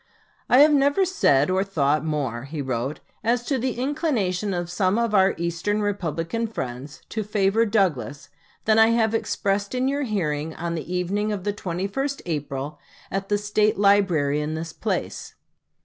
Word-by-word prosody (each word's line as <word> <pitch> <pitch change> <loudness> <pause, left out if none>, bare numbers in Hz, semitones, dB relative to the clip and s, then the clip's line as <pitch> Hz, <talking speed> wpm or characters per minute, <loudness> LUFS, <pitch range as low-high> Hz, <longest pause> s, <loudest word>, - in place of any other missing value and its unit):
"I 255 - +7
have 300 +1 +7
never 285 +6 +3
said 145 - +3
or 190 +1 +2
thought 155 -6 +1
more," 140 -5 -3
wrote 135 -2 -2
he, - - -38
"as 235 +2 +1
to 265 +1 -1
the 255 +1 -1
inclination 245 - 0
of 175 -1 -3
some 185 +3 +1
of 235 -2 0
our 190 -1 +4
Eastern 170 +5 -1
Republican 200 +2 -2
friends 135 - -6
to 220 - -2
favor 210 +2 +2
Douglas, 145 - 0 0.4
than 220 0 +4
I 230 +1 +5
expressed 200 -1 -1
in 255 +1 +1
your 280 +1 0
hearing 160 - -2
on 170 +1 -3
the 165 +1 -5
evening 195 +4 -1
of 200 -3 -3
the 205 0 -1
21st 200 +10 -3
April, 145 -3 -4 0.3
at 195 +1 -3
the 205 - +2
State 210 +1 +1
Library 185 -8 +3
in 155 +1 -3
this 160 +1 -5
place. - - -3
195 Hz, 165 wpm, -24 LUFS, 155-220 Hz, 0.4 s, I